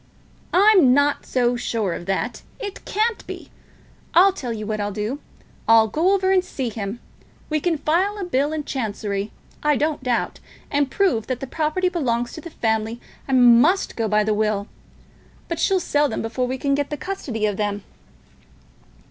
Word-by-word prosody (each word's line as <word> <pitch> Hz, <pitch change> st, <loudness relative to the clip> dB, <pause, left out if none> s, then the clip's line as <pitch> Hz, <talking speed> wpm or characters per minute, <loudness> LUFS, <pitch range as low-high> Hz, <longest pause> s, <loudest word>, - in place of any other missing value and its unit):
"I'm 370 Hz, -10 st, +6 dB
not 285 Hz, 0 st, +1 dB
so 245 Hz, -1 st, +1 dB
sure 225 Hz, -6 st, -1 dB
of 175 Hz, -, -7 dB
that. 215 Hz, +5 st, -2 dB, 0.2 s
It 410 Hz, -4 st, -7 dB
can't 440 Hz, +2 st, 0 dB
be. -, -, -8 dB, 0.6 s
I'll 375 Hz, +3 st, +7 dB
tell 255 Hz, -10 st, -5 dB
you 215 Hz, -2 st, -4 dB
what 215 Hz, 0 st, -3 dB
I'll 205 Hz, 0 st, -2 dB
do. 215 Hz, +7 st, -3 dB, 0.5 s
I'll 225 Hz, -1 st, +6 dB
go 335 Hz, -, +2 dB
over 380 Hz, -1 st, +1 dB
and 375 Hz, -1 st, +4 dB
see 265 Hz, -8 st, -4 dB
him. 210 Hz, +1 st, -5 dB, 0.5 s
We 310 Hz, -, +2 dB
can 330 Hz, +1 st, 0 dB
file 360 Hz, +8 st, +1 dB
a 400 Hz, -, -4 dB
bill 290 Hz, -4 st, 0 dB
in 310 Hz, -1 st, -3 dB
Chancery, 210 Hz, -6 st, -3 dB, 0.3 s
I 300 Hz, 0 st, +3 dB
don't 300 Hz, +2 st, 0 dB
doubt, 250 Hz, -2 st, -1 dB, 0.3 s
and 285 Hz, -1 st, +1 dB
prove 305 Hz, -, +1 dB
that 255 Hz, -2 st, -2 dB
the -, -, -4 dB
property 315 Hz, +6 st, 0 dB
belongs 245 Hz, -9 st, -1 dB
to 315 Hz, -, -8 dB
the 335 Hz, -, -8 dB
family 220 Hz, -3 st, -1 dB, 0.3 s
and 245 Hz, -3 st, +6 dB
must 360 Hz, +8 st, +2 dB
go 225 Hz, -1 st, -1 dB
by 210 Hz, 0 st, +3 dB
the 215 Hz, 0 st, +1 dB
will. 210 Hz, -1 st, 0 dB, 0.8 s
But 335 Hz, -1 st, -3 dB
she'll 385 Hz, +2 st, +2 dB
sell 295 Hz, -4 st, +1 dB
them -, -, -3 dB
before 250 Hz, +3 st, -2 dB
we 260 Hz, +1 st, -3 dB
can 275 Hz, +1 st, 0 dB
get 285 Hz, 0 st, 0 dB
the 295 Hz, -, -4 dB
custody 265 Hz, -, -3 dB
of 205 Hz, -2 st, -1 dB
them." 205 Hz, -1 st, -2 dB
260 Hz, 180 wpm, -22 LUFS, 220-330 Hz, 0.8 s, I'll